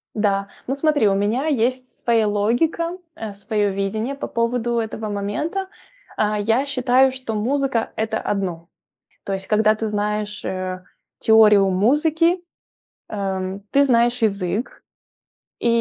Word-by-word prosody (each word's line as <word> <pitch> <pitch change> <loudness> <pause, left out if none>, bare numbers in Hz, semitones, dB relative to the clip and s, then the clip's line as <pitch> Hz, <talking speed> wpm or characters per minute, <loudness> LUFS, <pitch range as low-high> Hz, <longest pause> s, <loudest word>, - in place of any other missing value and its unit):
Да. 200 -2 +1 0.2
Ну, 270 - 0
смотри, 290 -6 +2
у 195 - +3
меня 220 +9 0
есть 255 -1 0 0.2
своя 225 -3 +3
логика, 310 - 0 0.2
э, 220 -8 -6
своё 205 0 -1
видение 215 +7 -2
по - - -5
поводу 235 0 0
этого 220 -1 -4
момента. 210 - -2 0.5
А, 210 0 +1
я 225 +6 +1
считаю, 260 -1 +3
что 255 -4 -5
музыка- 260 +1 0
это 220 0 -1
одно. 175 -4 -3 0.6
То 195 - -3
есть 190 0 -5
когда 215 0 +3
ты 220 0 -3
знаешь, 210 0 -2
э, 185 0 -3 0.4
теорию 210 -3 +6
музыки, 305 - +3 0.7
э, - - -7
м, 190 0 -3
ты 280 +1 +5
знаешь 240 -2 +2
язык 200 +1 -1 0.8
и, - - -1
220 Hz, 135 wpm, -21 LUFS, 205-255 Hz, 0.8 s, теорию